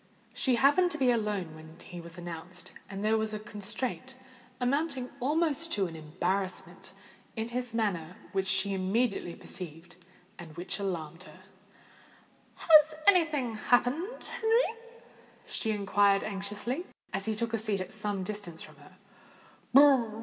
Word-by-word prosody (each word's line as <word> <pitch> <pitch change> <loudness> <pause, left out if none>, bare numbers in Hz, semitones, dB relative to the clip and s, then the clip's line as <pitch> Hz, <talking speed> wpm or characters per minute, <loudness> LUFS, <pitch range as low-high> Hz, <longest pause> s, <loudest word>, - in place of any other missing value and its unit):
She 255 -2 +2
happened 290 +9 +4
to 310 - -2
be 260 -4 +4
alone 210 -8 -1
when 160 +1 -13
he 175 -1 -9
was 170 +1 -10
announced; 175 +1 -7 0.2
and 200 +1 -4
there 220 +1 +3
was 220 0 -2
a - - -4
constraint—amounting 255 +5 -3
almost 315 +4 +1
to 200 -2 +1
an 165 -2 -6
embarrassment—in 185 +6 -4
his 245 -1 -3
manner 180 -7 -1 0.2
which 190 -1 0
she 190 +1 +2
immediately 195 -1 0
perceived, 170 -1 -8 0.4
and 160 -2 -10
which 180 +3 -2
alarmed 170 -4 -4
her. - - -15 1.1
"Has 310 -1 +6
any 365 -4 +7
thing 275 -7 -2
happened, 250 - +1
Henry?" 450 +1 +1 0.7
she 220 - -1
inquired 200 -1 +3
anxiously, 210 - -3 0.3
as 195 0 -1
he 220 - 0
took 230 +1 -2
a 225 - +1
seat 210 -2 -1
at 185 - -5
some 205 -2 -2
distance 185 -4 -4
from - - -14
her. - - -17
210 Hz, 135 wpm, -30 LUFS, 185-255 Hz, 1.1 s, any